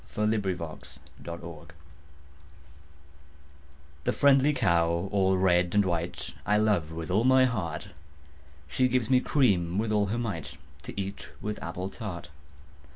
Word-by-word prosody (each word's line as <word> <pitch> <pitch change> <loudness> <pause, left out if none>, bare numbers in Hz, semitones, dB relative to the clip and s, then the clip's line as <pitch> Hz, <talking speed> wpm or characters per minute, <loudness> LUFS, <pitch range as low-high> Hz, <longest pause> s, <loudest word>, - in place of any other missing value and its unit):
XXIII 105 0 +2
The 80 -8 -5 0.3
Cow 85 -2 -8 2.4
The - - +1
friendly 140 +1 +4
cow 85 - +1
all 95 -2 +2
red 90 -1 +2
and 105 -1 +4
white, 85 -1 -3
I 105 - +2
love 105 -7 +1
with 80 +1 -5
all 105 +5 +3
my 130 +1 +5
heart: 100 -7 -3 0.8
She 125 - +2
gives 125 -1 0
me 130 - +6
cream 95 - +2
with 110 +1 0
all 105 -1 +2
her 110 +4 -2
might, 80 - -4 0.3
To - - -6
eat 100 +1 -5
with 105 0 -5
apple 90 +3 -4
tart. 95 -8 -7
95 Hz, 135 wpm, -28 LUFS, 85-110 Hz, 2.4 s, me